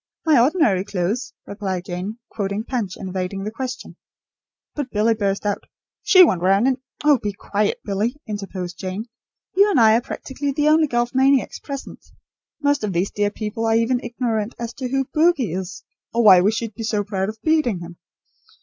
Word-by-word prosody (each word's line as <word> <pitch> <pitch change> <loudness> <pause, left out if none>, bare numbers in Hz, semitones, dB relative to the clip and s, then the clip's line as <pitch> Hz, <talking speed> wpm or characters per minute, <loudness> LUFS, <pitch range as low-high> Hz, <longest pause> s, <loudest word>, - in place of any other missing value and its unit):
"My 310 -5 +5
ordinary 240 - +3
clothes," 200 +4 -2
replied 190 -3 -4
Jane; 185 +5 -5
quoting 200 +1 -2
Punch, 225 -7 -3
and 190 - -6
evading 185 +1 -3
the 210 - -4
question. 255 +2 -6 0.8
But 290 -3 -4
Billy 220 +1 +2
burst 200 -2 -1
out: 205 -1 -1 0.4
"She 370 -1 +7
went 185 - +2
round 195 +6 +3
in 260 -1 0
" - - -16
"Oh, 295 -4 +5
be 205 -1 -2
quiet, 205 +1 -1
Billy," 210 +5 -1
interposed 195 -4 -6
Jane. 190 +3 -4 0.5
"You 400 +2 +5
and 320 - +3
I 220 -1 +6
are 235 - +2
practically 275 +2 -4
the 295 +2 +2
only 310 0 +4
golf 240 -2 0
maniacs 265 0 +2
present. 275 -2 -8 0.6
Most 285 -4 +2
of 205 -3 -1
these 175 +3 0
dear 205 0 0
people 215 +2 -4
are 225 - +3
even 230 +2 +2
ignorant 235 -2 -2
as 235 0 -5
to 255 -2 -5
who 270 +1 0
'bogie' 305 - +2
is, 185 0 -5 0.3
or 235 0 +1
why 190 -4 +8
we 200 +4 +3
should 225 0 -4
be 225 - -8
so 215 -2 0
proud 195 -1 -2
of 220 - -7
beating 305 - +1
him. 170 0 -9
220 Hz, 190 wpm, -21 LUFS, 195-260 Hz, 0.8 s, why